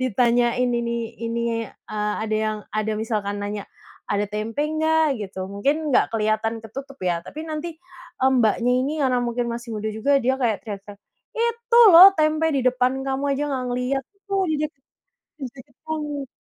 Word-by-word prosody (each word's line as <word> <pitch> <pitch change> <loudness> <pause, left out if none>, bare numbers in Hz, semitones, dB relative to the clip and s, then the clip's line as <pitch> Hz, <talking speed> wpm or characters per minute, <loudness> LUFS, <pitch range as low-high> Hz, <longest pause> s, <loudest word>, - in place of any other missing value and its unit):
ditanyain 245 +1 +2
ini 235 -1 -1 0.2
ini 230 0 -2 0.2
a - - -7 0.3
ada 215 0 -1
yang 215 0 -1 0.2
ada 215 0 0
misalkan 205 -2 -2
nanya, 205 -1 -4 0.5
"Ada 205 0 +1
tempe 215 +6 -3
nggak?" 315 -2 +2
Gitu. 190 -1 -7
Mungkin 240 +9 +1 0.2
nggak - - +5
keliatan 220 +1 0
ketutup 270 +5 -8
ya 170 -1 0
tapi 290 +12 -8
nanti, 310 +2 -4 0.5
Mbaknya, 245 -2 +3
ini 280 +3 -1
karena 255 -3 +2
mungkin 240 0 -1
masih 235 0 -6
muda 215 +1 -3
juga 220 +6 -1
dia 260 +1 +3
kayak 225 -5 +2
teriak-teriak, 205 -1 -8 0.4
"Itu 470 0 0 0.2
loh 360 +3 +12
tempe 310 +1 +2
di 275 - +1
depan 255 0 +1
kamu 270 +1 -1
aja 275 +2 -1
nggak 260 -2 -2
ngeliat, 250 +2 -1
itu 400 - -41
tuh 395 -1 +1
di - - +1
dek 305 0 -2 0.7
di 280 - -8
deket 270 -1 -15
kamu." 295 -3 -4
245 Hz, 170 wpm, -23 LUFS, 220-285 Hz, 0.7 s, loh